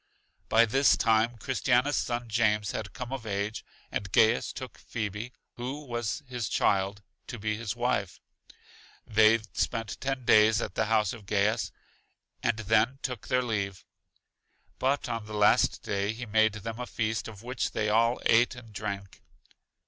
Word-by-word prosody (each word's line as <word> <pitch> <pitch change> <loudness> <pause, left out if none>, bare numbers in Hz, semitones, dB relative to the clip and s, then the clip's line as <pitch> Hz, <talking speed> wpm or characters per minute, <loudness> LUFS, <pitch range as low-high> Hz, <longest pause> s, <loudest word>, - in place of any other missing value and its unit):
By 115 +1 +6
this 135 +5 +4
time 115 +1 +2
Christiana's 130 +2 +1
son 120 0 -2
James 110 -2 +1
had 105 -2 -5
come 125 +1 -6
of 125 -4 -5
age, 100 +1 -2 0.3
and 100 -2 -3
Gaius 110 +3 +3
gave 130 - -7
Phebe 110 +1 -5 0.3
(who 135 +5 -5
was 120 +3 -3
his 125 -4 -3
child) 100 +1 +1 0.2
to 120 - -6
be 110 0 -2
his 110 -1 -4
wife. 120 -6 -1 0.9
They 110 +1 +5 0.2
spent 115 -4 -2
ten 135 -2 -2
days 110 0 +6
at 95 - -4
the 110 - 0
house 110 -2 +2
of 110 -4 -11
Gaius, 105 +2 +1 0.7
and 120 -2 +1
then 110 +4 +2
took 125 -5 -4
their 125 -1 +2
leave. 100 -5 -3 0.9
But 135 +2 +1
on 115 -3 -4
the 110 - -6
last 105 0 +3
day 100 +1 -1
he 120 +2 -6
made 110 0 +3
them 110 +2 -6
a 125 - -4
feast, 110 -1 -2
of 110 -1 -11
which 125 +1 -2
they 105 - 0
all 115 +3 +3
ate 120 +3 +4
and 115 -3 -12
drank. 100 -1 -5
110 Hz, 160 wpm, -28 LUFS, 105-120 Hz, 0.9 s, By